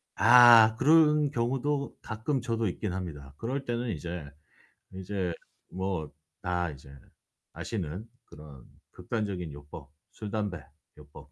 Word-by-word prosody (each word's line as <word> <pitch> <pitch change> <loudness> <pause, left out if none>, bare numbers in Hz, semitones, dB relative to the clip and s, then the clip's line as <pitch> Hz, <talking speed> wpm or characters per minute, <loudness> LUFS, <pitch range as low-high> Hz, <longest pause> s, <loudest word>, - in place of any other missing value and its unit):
아 115 -2 +8
그런 150 +2 +4
경우도 135 +4 -1
가끔 120 +5 -2
저도 115 -2 -1
있긴 90 +1 -3
합니다. 75 -7 -7
그럴 135 +4 -3
때는 120 0 -2
이제 85 -1 -5 0.7
이제 95 -1 -3 0.4
뭐 95 -4 -3 0.3
다 90 -1 -1
이제 70 0 -13 0.6
아시는 95 -1 -5 0.2
그런 75 -4 -13 0.3
극단적인 95 -8 -4
요법, 75 0 -11 0.2
술 105 -2 -7
담배 100 -6 -3 0.4
요법. 75 0 -15
100 Hz, 230 characters per minute, -29 LUFS, 80-120 Hz, 0.7 s, 아